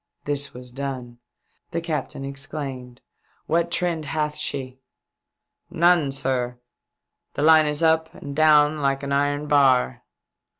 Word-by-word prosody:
This 145 -1 -1
was 125 0 -11
done. 130 -3 -6 0.5
The 170 - -2
captain 150 -4 -4
exclaimed 135 -3 -6 0.2
" - - -39
What 170 +2 +1
trend 170 -2 -1
hath 150 0 -2
she 130 -3 -3 0.3
?" - - -61
" - - -59
None, 170 -4 +3
sir. 125 -2 -2 0.8
The 145 - -1
line 155 -1 +6
is 150 +2 -1
up 160 0 +2
and 140 -1 -8
down 150 0 +4
like 135 0 0
an 140 - -4
iron 145 +1 0
bar." 135 - +3
145 Hz, 140 wpm, -23 LUFS, 135-155 Hz, 0.8 s, line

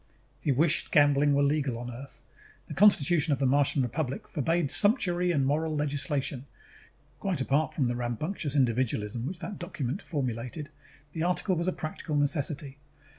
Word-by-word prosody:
_ - - -33 0.4
He 145 - 0
wished 155 +5 +2
gambling 145 -1 +4
were 140 - +3
legal 140 -4 0
on 120 +1 -6
Earth. 130 +4 -8 0.4
The - - -6
Constitution 170 -5 +4
of - - 0
the 140 - +1
Martian 140 +1 +3
Republic 130 +2 -3
forbade 160 0 0
sumptuary 180 -5 +2
and 140 -5 +1
moral 155 +3 0
legislation; 145 -2 -1 0.7
quite 190 -5 -1
apart 140 +4 0
from 135 -5 +1
the 120 - -1
rambunctious 135 - -3
individualism 120 -3 0
which 180 +3 -5
that 175 +4 -7
document 170 - -4
formulated, 130 0 -4 0.4
the 160 - -4
article 180 +2 +1
was 170 +1 -2
a - - +3
practical 155 -2 -5
necessity. 145 -1 -1
145 Hz, 160 wpm, -28 LUFS, 135-165 Hz, 0.7 s, gambling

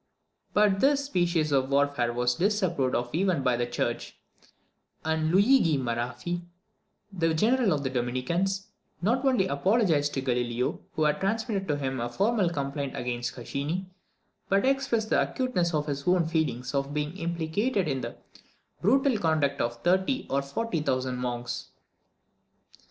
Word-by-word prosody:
But 205 -2 +4
this 280 +2 +3
species 170 - +1
of 135 -1 +2
warfare 140 -4 +2
was 125 +1 +1
disapproved 175 - +1
of 120 0 -1
even 175 -4 +1
by 125 -2 +3
the 120 0 -1
church; 120 0 -3 0.9
and 160 0 +1
Luigi 195 - +4
Maraffi, 125 +7 -3 0.7
the 165 -3 +1
general 230 +4 +3
of 145 -3 0
the 130 - -2
Dominicans, 170 - -1 0.3
not 240 +7 +2
only 255 -8 +3
apologised 160 -2 +2
to 135 - 0
Galileo, 125 -1 -1
who 155 - 0
had 150 0 +2
transmitted 200 -1 -1
to 150 - 0
him 135 -2 -2
a 120 +1 -2
formal 200 - +1
complaint 140 -3 -3
against 120 -1 -3
Caccini, 145 +9 -3 0.6
but 195 +3 +3
expressed 260 -5 +1
the - - +4
acuteness 195 -10 0
of 150 -2 0
his 140 0 -4
own 180 -2 +4
feelings 150 -6 -1
on 140 0 -1
being 150 +3 -2
implicated 170 +5 -1
in 135 -3 -1
the 120 -1 -5 0.7
"brutal 260 +3 +3
conduct 155 -5 +1
of 120 0 -3
thirty 190 +9 +2
or 140 - +2
forty 165 +5 -2
thousand 130 -3 -1
monks." 120 -1 -4
155 Hz, 145 wpm, -27 LUFS, 130-195 Hz, 0.9 s, But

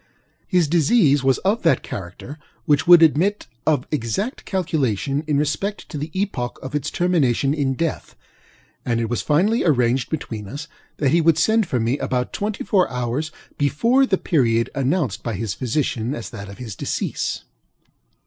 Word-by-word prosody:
His 180 -5 +2
disease 155 - +3
was 135 -1 +3
of 210 +4 +2
that 165 - +2
character 100 - -8 0.3
which 150 +2 +2
would 175 -1 +9
admit 175 +7 +2 0.2
of 145 -5 +2
exact 150 - -2
calculation 145 - -1
in 150 -2 +1
respect 175 +8 -2
to 155 - -6
the 150 +3 -4
epoch 130 -12 -2
of 130 - -7
its 150 -2 -1
termination 145 -7 +1
in 140 -3 0
death; 165 +2 -3 0.7
and 115 -1 0
it 115 0 -2
was 120 - 0
finally 195 +10 +2
arranged 125 -5 +2
between 110 -9 -5
us 145 +8 -7 0.3
that 140 - +1
he 170 +2 +4
would 165 -1 +4
send 220 +4 +2
for 125 - -1
me 115 +5 0
about 125 -1 -2
twenty 205 0 -3
four 195 -2 +2
hours 125 +5 -2 0.3
before 230 - +3
the 190 - +2
period 115 -10 +1
announced 135 - 0
by 115 -3 -3
his 105 0 -3
physicians 125 -1 -2
as 120 - -6
that 100 0 -8
of 100 - -10
his 115 -5 -7
decease. - - -3
145 Hz, 170 wpm, -21 LUFS, 125-170 Hz, 0.7 s, would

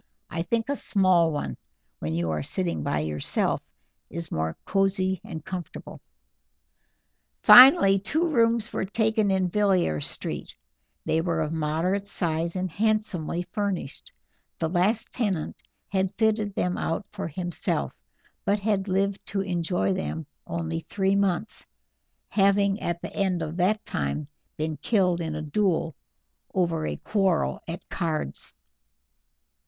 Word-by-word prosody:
I 165 - -2
think 225 +6 -1
a 285 - 0
small 185 -8 +3
one, 105 - -3 0.4
when 80 +1 -2
you 85 -1 0
are 75 -1 -1
sitting 85 +2 0
by 75 0 0
yourself, 75 -2 -1 0.5
is 170 -1 -6
more 80 +1 -2
cozy 190 -1 +1
and 165 -7 -8
comfortable." 185 -3 -7 1.4
Finally 245 - +9
two 310 - 0
rooms 230 -5 +2
were - - -1
taken 220 +1 +1
in 190 -1 +2
Villiers 180 - +1
Street; - - -4 0.5
they 160 - +2
were 165 -1 -1
of 155 0 -1
moderate 165 +6 -1
size 170 -3 -1
and 185 0 -1
handsomely 200 -5 0
furnished: 200 -9 -3 0.5
the 165 - 0
last 190 +7 +1
tenant 195 -10 -2 0.3
had 190 -1 0
fitted 215 -2 +1
them 180 0 0
out 165 +5 -2
for 195 -4 -4
himself, 175 +2 -2 0.5
but 200 +1 +2
had 200 -1 0
lived 195 +1 0
to 195 - -1
enjoy 180 0 0
them 165 -4 -3 0.2
only 165 -1 -2
three 195 +3 0
months, 200 +1 -1 0.6
having 200 0 +3
at 170 0 -2
the - - -6
end 185 -4 0
of 155 +1 -5
that 200 +4 +1
time 70 +1 -2 0.3
been 155 0 -2
killed 180 -6 +1
in 160 -2 -3
a 155 - -4
duel 165 0 0 0.6
over 170 -4 +1
a - - -3
quarrel 195 -6 0
at 170 +2 -6
cards. 155 - -3
185 Hz, 135 wpm, -26 LUFS, 160-200 Hz, 1.4 s, Finally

